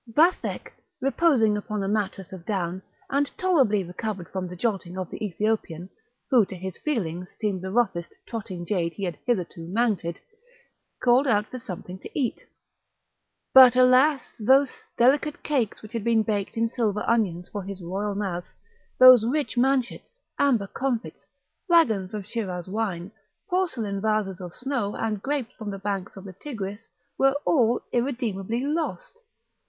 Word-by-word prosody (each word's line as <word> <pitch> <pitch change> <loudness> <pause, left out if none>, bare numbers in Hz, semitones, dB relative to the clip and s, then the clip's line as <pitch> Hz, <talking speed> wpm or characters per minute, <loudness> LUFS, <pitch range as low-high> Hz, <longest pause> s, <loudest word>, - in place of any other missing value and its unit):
Vathek, 325 +9 +2 0.3
reposing 270 -6 +3
upon 210 0 -3
a - - -2
mattress 195 -2 -2
of 185 -3 -9
down, 185 -2 -2 0.3
and 280 +1 +1
tolerably 270 - +3
recovered 180 0 -5
from 185 -1 -4
the 180 - -8
jolting 185 -3 -2
of 185 -2 -4
the - - -6
Ethiopian, 195 -3 -2 0.4
who 245 -4 +6
to 190 - -6
his 185 0 -6
feelings 180 - -2
seemed 205 -4 -1
the 190 - -4
roughest 190 -6 0
trotting 190 -6 -5
jade 170 -4 -1
he 200 - -7
had 175 -4 -2
hitherto 180 -7 -1
mounted, 200 -4 0 0.8
called 255 +3 +4
out 210 -4 +3
for 255 - -8
something 185 -5 -8
to - - -9
eat. 250 -4 -1 1.1
But, 260 -2 +10
alas! 255 +3 +4
those 265 +3 +4 0.2
delicate 285 +5 +3
cakes 255 -10 -1
which 215 +2 -11
had 230 -3 -2
been 230 -1 +3
baked 210 -1 -2
in 230 0 +2
silver 220 -3 -1
ovens 190 -8 0
for 205 - -4
his 195 -1 -7
royal 200 +4 -3
mouth, 185 -4 -3 0.5
those 255 -3 +9
rich 280 +5 -1
manchets, 265 - 0 0.2
amber 245 -8 +3
comfits, 245 +2 -3 0.4
flagons 220 - +3
of 205 -2 -5
Schiraz 190 -5 -4
wine, 195 -3 -3 0.4
porcelain 235 - -1
vases 210 -3 0
of 175 -1 -8
snow, 255 -6 -2
and 215 -3 -2
grapes 270 -3 -2
from 215 -3 -7
the 200 - -4
banks 195 -1 -4
of 195 - -9
the 195 -2 -9
Tigris, 205 - -7 0.3
were 270 0 +5
all 240 -6 +3
irremediably 235 -3 -1
lost! 335 +11 -3
215 Hz, 155 wpm, -25 LUFS, 190-255 Hz, 1.1 s, But